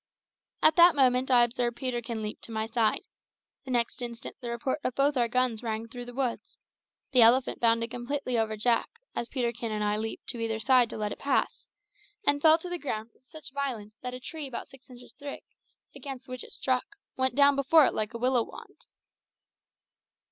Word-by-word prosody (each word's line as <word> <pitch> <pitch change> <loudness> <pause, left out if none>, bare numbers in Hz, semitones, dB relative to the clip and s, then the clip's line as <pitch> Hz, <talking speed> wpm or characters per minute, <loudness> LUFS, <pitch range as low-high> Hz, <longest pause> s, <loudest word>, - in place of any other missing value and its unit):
At 310 +1 +6
that 345 -1 +8
moment 255 -1 +3
I 245 -2 +6
observed 240 0 -1
Peterkin 240 -4 -3
leap 210 - -5
to - - -9
my 220 0 -1
side; 225 -1 +1 0.6
the - - -9
next 240 -1 0
instant 235 -1 -6
the 240 - -5
report 235 +5 -2
of 255 - -2
both 285 +1 +2
our 240 -2 +2
guns 245 -2 0
rang 225 -1 -3
through 245 +1 -8
the 245 - -8
woods; 255 -3 -3 0.5
the 255 -2 +5
elephant 245 +3 +5
bounded 230 0 +2
completely 250 +1 -3
over 220 -1 0
Jack, 230 +2 +1 0.3
as 235 - -2
Peterkin 235 -3 -2
and 210 0 -1
I 210 0 +1
leaped 220 +1 -5
to 240 - -2
either 225 -1 -1
side 250 -1 +4
to - - -6
let 210 -1 -2
it - - -6
pass, 280 - 0 0.6
and 285 0 +3
fell 315 +1 +7
to 335 - -8
the 355 0 -3
ground 225 -6 -4
with 255 - -34
such 310 -4 -10
violence 240 -7 -4
that 250 0 -5
a - - -7
tree 300 +3 -6
about 255 - -6
six 265 -1 -18
inches 245 -1 -13
thick, 285 -1 -8 0.5
against 270 -2 -8
which 255 -1 -6
it - - -12
struck, 260 +9 -2 0.2
went 260 0 0
down 285 0 +6
before 280 +2 +5
it - - +1
like 215 +2 -2
a - - -1
willow 250 +1 +2
wand. - - -11
245 Hz, 200 wpm, -28 LUFS, 230-270 Hz, 0.6 s, that